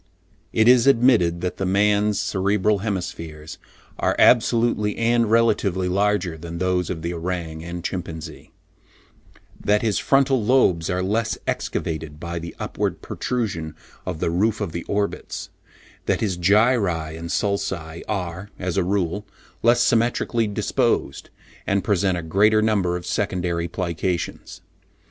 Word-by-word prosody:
It 110 Hz, -, +3 dB
is 125 Hz, 0 st, +6 dB
admitted 115 Hz, -10 st, +4 dB
that 90 Hz, -, -3 dB
the 95 Hz, -, -2 dB
man's 105 Hz, +1 st, +2 dB
cerebral 100 Hz, +1 st, +1 dB
hemispheres 85 Hz, -6 st, -5 dB, 0.4 s
are -, -, +1 dB
absolutely 115 Hz, -3 st, +3 dB
and 115 Hz, -1 st, +2 dB
relatively 105 Hz, -5 st, +2 dB
larger 95 Hz, -3 st, 0 dB
than 85 Hz, +1 st, -7 dB
those 90 Hz, -1 st, 0 dB
of 80 Hz, -3 st, -4 dB
the 85 Hz, +1 st, -2 dB
orang 85 Hz, -2 st, -4 dB
and 85 Hz, 0 st, -6 dB
chimpanzee; 80 Hz, -4 st, -6 dB, 1.1 s
that 105 Hz, +2 st, +2 dB
his 110 Hz, -3 st, +1 dB
frontal 135 Hz, -3 st, +2 dB
lobes 105 Hz, -9 st, +3 dB
are 90 Hz, 0 st, 0 dB
less 105 Hz, +1 st, 0 dB
excavated 80 Hz, -2 st, -3 dB
by 85 Hz, +1 st, -4 dB
the 85 Hz, 0 st, -8 dB
upward -, -, -3 dB
protrusion 95 Hz, -11 st, -3 dB, 0.3 s
of 80 Hz, -, -4 dB
the 85 Hz, -, 0 dB
roof 105 Hz, +5 st, +1 dB
of 100 Hz, -6 st, -3 dB
the 85 Hz, -, -4 dB
orbits; 100 Hz, 0 st, -3 dB, 0.6 s
that -, -, +1 dB
his 100 Hz, -5 st, 0 dB
gyri 95 Hz, -4 st, +2 dB
and 85 Hz, +1 st, -7 dB
sulci 95 Hz, -5 st, -2 dB
are, 95 Hz, -1 st, -3 dB
as 90 Hz, 0 st, -3 dB
a 95 Hz, -, +3 dB
rule, 100 Hz, +2 st, -1 dB, 0.3 s
less 120 Hz, +1 st, +4 dB
symmetrically 115 Hz, -1 st, +1 dB
disposed, 105 Hz, -, -1 dB, 0.4 s
and 100 Hz, -1 st, +1 dB
present 95 Hz, -2 st, +1 dB
a 85 Hz, -, -4 dB
greater 105 Hz, +6 st, +3 dB
number 100 Hz, -5 st, +1 dB
of 90 Hz, -, -9 dB
secondary 90 Hz, -5 st, -1 dB
plications. 85 Hz, 0 st, -3 dB
95 Hz, 135 wpm, -23 LUFS, 85-105 Hz, 1.1 s, is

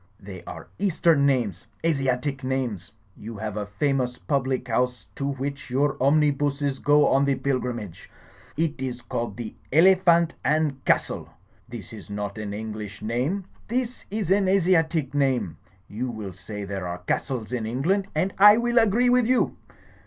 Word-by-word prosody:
They 95 Hz, -3 st, -10 dB
are 80 Hz, -2 st, -8 dB
eastern 165 Hz, -6 st, +3 dB
names, 115 Hz, -10 st, 0 dB, 0.2 s
Asiatic 135 Hz, -2 st, 0 dB
names. 125 Hz, -9 st, -2 dB, 0.2 s
You 110 Hz, +1 st, -8 dB
have 105 Hz, 0 st, -4 dB
a 105 Hz, -1 st, -3 dB
famous 125 Hz, +2 st, -1 dB
public 130 Hz, -3 st, -1 dB
house 125 Hz, +1 st, 0 dB
to 140 Hz, -, -3 dB
which 140 Hz, +1 st, -5 dB
your 135 Hz, +3 st, +1 dB
omnibuses 145 Hz, -1 st, +2 dB
go 145 Hz, 0 st, +4 dB
on 135 Hz, +1 st, +3 dB
the 140 Hz, -1 st, +2 dB
pilgrimage. 125 Hz, -9 st, -3 dB, 0.5 s
It 155 Hz, -4 st, -1 dB
is 125 Hz, -2 st, -4 dB
called 115 Hz, -3 st, -4 dB
the 115 Hz, -3 st, -6 dB, 0.2 s
Elephant 170 Hz, 0 st, +5 dB
and 150 Hz, -3 st, +1 dB
Castle. -, -, +1 dB, 0.4 s
That 115 Hz, -4 st, -9 dB
is 105 Hz, -2 st, -10 dB
not 105 Hz, +1 st, -4 dB
an 105 Hz, -1 st, -4 dB
English 105 Hz, -1 st, -6 dB
name. 130 Hz, -, -1 dB, 0.2 s
It 250 Hz, +1 st, -2 dB
is 200 Hz, -3 st, -2 dB
an 195 Hz, 0 st, +3 dB
Asiatic 165 Hz, -6 st, +2 dB
name. 130 Hz, -, 0 dB, 0.3 s
You 120 Hz, +5 st, -4 dB
will 105 Hz, -5 st, -6 dB
say 100 Hz, +3 st, -7 dB
there 95 Hz, -2 st, -4 dB
are 90 Hz, +1 st, -6 dB
castles 125 Hz, -1 st, -2 dB
in 115 Hz, -3 st, -2 dB
England, 170 Hz, -, 0 dB
and 185 Hz, +5 st, 0 dB
I 210 Hz, +2 st, +9 dB
will 240 Hz, 0 st, +3 dB
agree 230 Hz, +3 st, +3 dB
with 250 Hz, -2 st, +4 dB
you. 255 Hz, 0 st, +2 dB
135 Hz, 155 wpm, -25 LUFS, 110-160 Hz, 0.5 s, I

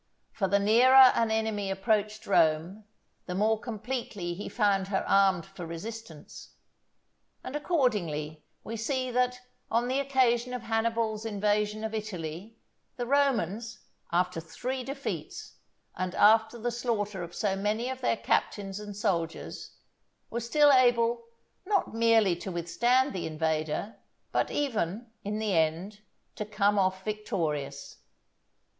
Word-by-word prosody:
For 195 Hz, -, -1 dB
the 200 Hz, +2 st, +3 dB
nearer 250 Hz, +5 st, +7 dB
an 230 Hz, -1 st, +1 dB
enemy 220 Hz, -2 st, -1 dB
approached 210 Hz, +2 st, 0 dB
Rome, 170 Hz, +3 st, +2 dB, 0.4 s
the 180 Hz, -, -3 dB
more 215 Hz, +3 st, +2 dB
completely 220 Hz, -5 st, -4 dB
he 195 Hz, +4 st, -6 dB
found 200 Hz, -4 st, +1 dB
her 195 Hz, -1 st, -1 dB
armed 195 Hz, -3 st, +3 dB
for 195 Hz, -2 st, -10 dB
resistance; 170 Hz, -1 st, -9 dB, 0.9 s
and 265 Hz, -, -6 dB
accordingly 175 Hz, -, -1 dB, 0.2 s
we 225 Hz, +1 st, -5 dB
see 255 Hz, +3 st, -2 dB
that 250 Hz, 0 st, +1 dB, 0.3 s
on 235 Hz, +2 st, +1 dB
the 260 Hz, +2 st, 0 dB
occasion 250 Hz, -3 st, +1 dB
of 245 Hz, -, -6 dB
Hannibal's 225 Hz, -1 st, -1 dB
invasion 210 Hz, 0 st, 0 dB
of 220 Hz, 0 st, -3 dB
Italy, 200 Hz, -1 st, -6 dB, 0.4 s
the 245 Hz, -, -2 dB
Romans, 235 Hz, -, 0 dB, 0.3 s
after 175 Hz, -1 st, +1 dB
three 250 Hz, +11 st, -4 dB
defeats, 275 Hz, +2 st, -6 dB, 0.4 s
and 185 Hz, -1 st, -3 dB
after 220 Hz, +2 st, +5 dB
the 240 Hz, +1 st, -2 dB
slaughter 215 Hz, -5 st, -2 dB
of 170 Hz, 0 st, -7 dB
so 200 Hz, -3 st, 0 dB
many 210 Hz, +4 st, -1 dB
of 260 Hz, 0 st, -5 dB
their 240 Hz, -, +1 dB
captains 195 Hz, -2 st, -1 dB
and 205 Hz, -1 st, -8 dB
soldiers, 170 Hz, -6 st, -3 dB, 0.6 s
were 235 Hz, -, -2 dB
still 290 Hz, +5 st, +4 dB
able, 240 Hz, -2 st, +3 dB, 0.4 s
not 395 Hz, -, 0 dB
merely 225 Hz, -5 st, +4 dB
to 190 Hz, +2 st, -6 dB
withstand 240 Hz, -, +1 dB
the 180 Hz, -4 st, -3 dB
invader, 155 Hz, +5 st, -2 dB, 0.3 s
but -, -, +1 dB
even, 225 Hz, -, -2 dB
in 210 Hz, +1 st, -3 dB
the 215 Hz, -2 st, -1 dB
end, 165 Hz, +6 st, 0 dB, 0.3 s
to -, -, -4 dB
come 205 Hz, -1 st, +1 dB
off 190 Hz, 0 st, 0 dB
victorious. 160 Hz, -, -3 dB
215 Hz, 135 wpm, -29 LUFS, 190-235 Hz, 0.9 s, nearer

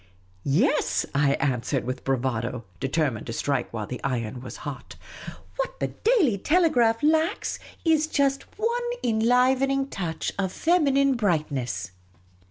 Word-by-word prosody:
" 90 Hz, 0 st, -33 dB, 0.2 s
Yes," 300 Hz, +1 st, +1 dB
I 140 Hz, 0 st, +3 dB
answered, 135 Hz, -1 st, 0 dB
with 130 Hz, +1 st, -4 dB
bravado, 125 Hz, -2 st, -1 dB
determined 135 Hz, -5 st, -1 dB
to 115 Hz, -, -4 dB
strike 135 Hz, 0 st, -1 dB
while 110 Hz, -2 st, -4 dB
the 125 Hz, -, -7 dB
iron 120 Hz, -3 st, -2 dB
was 130 Hz, -, -8 dB
hot. 145 Hz, -3 st, -7 dB, 0.3 s
'* -, -, -12 dB
What -, -, -3 dB
the -, -, -1 dB
Daily 365 Hz, -, +2 dB
Telephone 275 Hz, -, +3 dB, 0.2 s
lacks 320 Hz, +5 st, 0 dB, 0.3 s
is 315 Hz, -1 st, +3 dB
just 275 Hz, -3 st, +1 dB
one 470 Hz, +3 st, 0 dB, 0.2 s
enlivening 255 Hz, +4 st, +2 dB
touch 165 Hz, -, -3 dB
of 190 Hz, -2 st, 0 dB
feminine 275 Hz, -, +3 dB
brightness." 145 Hz, -, -1 dB
190 Hz, 135 wpm, -25 LUFS, -, 0.3 s, I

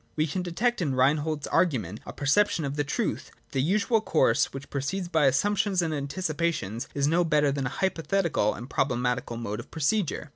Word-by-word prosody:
We 155 Hz, -, +2 dB
can 175 Hz, +4 st, -2 dB
detect 210 Hz, +7 st, 0 dB
in 140 Hz, -6 st, 0 dB
Rein 130 Hz, +4 st, +4 dB
hold's 150 Hz, -1 st, -3 dB
argument 125 Hz, -, 0 dB
a -, -, -5 dB
perception 155 Hz, +3 st, +2 dB
of 140 Hz, 0 st, -3 dB
the 145 Hz, -, 0 dB
truth, 145 Hz, -, -2 dB
that -, -, -34 dB
the 135 Hz, -, 0 dB
usual 205 Hz, -, +2 dB
course 145 Hz, -, +2 dB
which 135 Hz, +1 st, -9 dB
proceeds 175 Hz, +7 st, -2 dB
by 160 Hz, -5 st, +3 dB
assumptions 195 Hz, +6 st, +2 dB
and 160 Hz, -2 st, -1 dB
antici 150 Hz, +4 st, -3 dB
pations 140 Hz, -, -2 dB
is 140 Hz, -1 st, +1 dB
no 165 Hz, +4 st, +3 dB
better 150 Hz, -3 st, +2 dB
than 135 Hz, -1 st, -2 dB
a -, -, -7 dB
hypothetical 170 Hz, -, 0 dB
and 120 Hz, -, -8 dB
proble 135 Hz, -3 st, 0 dB
matical 125 Hz, -1 st, -2 dB
mode 105 Hz, -3 st, -4 dB
of -, -, -9 dB
procedure. 160 Hz, 0 st, -1 dB
150 Hz, 205 wpm, -27 LUFS, 135-175 Hz, -, Rein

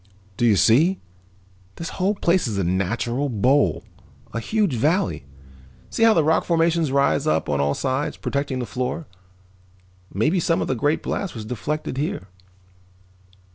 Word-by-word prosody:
"Do 120 Hz, +4 st, +2 dB
you 110 Hz, -, +5 dB
see? 150 Hz, -, +4 dB, 0.8 s
This 165 Hz, -, -5 dB
whole 200 Hz, +3 st, +2 dB
place 170 Hz, -5 st, +1 dB
is 105 Hz, -3 st, -3 dB
a 100 Hz, -, +1 dB
natural 120 Hz, +10 st, -1 dB
bowl, 120 Hz, -, +2 dB, 0.5 s
a 115 Hz, -, -2 dB
huge 205 Hz, -, 0 dB
valley. 155 Hz, -, 0 dB, 0.7 s
See -, -, -3 dB
how 225 Hz, -1 st, +6 dB
the 160 Hz, -, +4 dB
rock 160 Hz, +2 st, +2 dB
formations 165 Hz, -3 st, +1 dB
rise 140 Hz, +1 st, +2 dB
up -, -, +1 dB
on 70 Hz, -1 st, 0 dB
all 70 Hz, 0 st, +1 dB
sides, 135 Hz, +2 st, -2 dB
protecting 140 Hz, -2 st, -2 dB
the 125 Hz, -, -2 dB
floor. 130 Hz, +7 st, -3 dB, 1.1 s
Maybe 155 Hz, -, +1 dB
some 165 Hz, 0 st, +1 dB
of -, -, -1 dB
the -, -, 0 dB
great 145 Hz, +5 st, 0 dB
blast 190 Hz, -8 st, -3 dB
was 110 Hz, -2 st, -6 dB
deflected 130 Hz, +4 st, -4 dB
here." 120 Hz, -, -3 dB
140 Hz, 155 wpm, -23 LUFS, 115-165 Hz, 1.1 s, how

